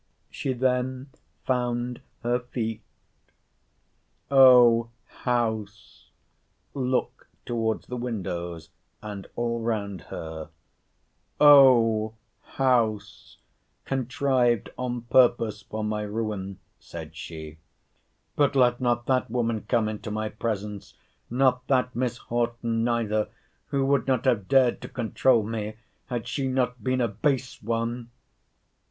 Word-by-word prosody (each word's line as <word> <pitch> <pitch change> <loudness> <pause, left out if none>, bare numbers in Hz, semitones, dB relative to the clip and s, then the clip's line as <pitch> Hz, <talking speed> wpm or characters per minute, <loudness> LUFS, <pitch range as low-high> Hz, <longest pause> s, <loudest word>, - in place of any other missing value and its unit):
She 135 - -2
then 130 +1 -1 0.3
found 125 -1 -1 0.2
her 120 +1 +1
feet—O 120 +1 +1 0.2
house 110 -4 -3 0.6
[look 130 -2 -2 0.2
towards 115 -2 -1
the 125 - -5
windows, 85 -8 -4 0.3
and 105 -2 -7
all 115 -1 -1
round 100 -5 -2
her, 80 -1 -7 0.9
O 120 -7 +6 0.3
house,] 115 -5 -1 0.5
contrived 130 -3 +1
on 125 -1 -3
purpose 115 -3 +3
for 110 +2 -5
my 105 0 -1
ruin! 105 -3 -4 0.2
said 80 -2 -9
she—but 80 - -6
let 125 -1 +3
not 120 -1 +1
that 130 -1 +1
woman 115 -3 -1
come 115 -3 +2
into 110 0 -5
my 110 0 -2
presence—not 115 +4 -2
that 125 -2 +1
Miss 120 -1 -1
Horton 115 -1 -1
neither, 115 -3 0 0.4
who 135 -1 0
would 140 -3 +1
not 130 -2 +1
have 115 -7 +1
dared 130 -3 +3
to - - -8
controul 120 -1 +2
me, 110 0 -4 0.3
had 120 -3 -4
she 135 -2 -2
not 125 -3 -1
been 130 +1 +1
a 120 - +2
base 130 +5 -1
one! 115 +2 -2
120 Hz, 105 wpm, -26 LUFS, 110-125 Hz, 0.9 s, O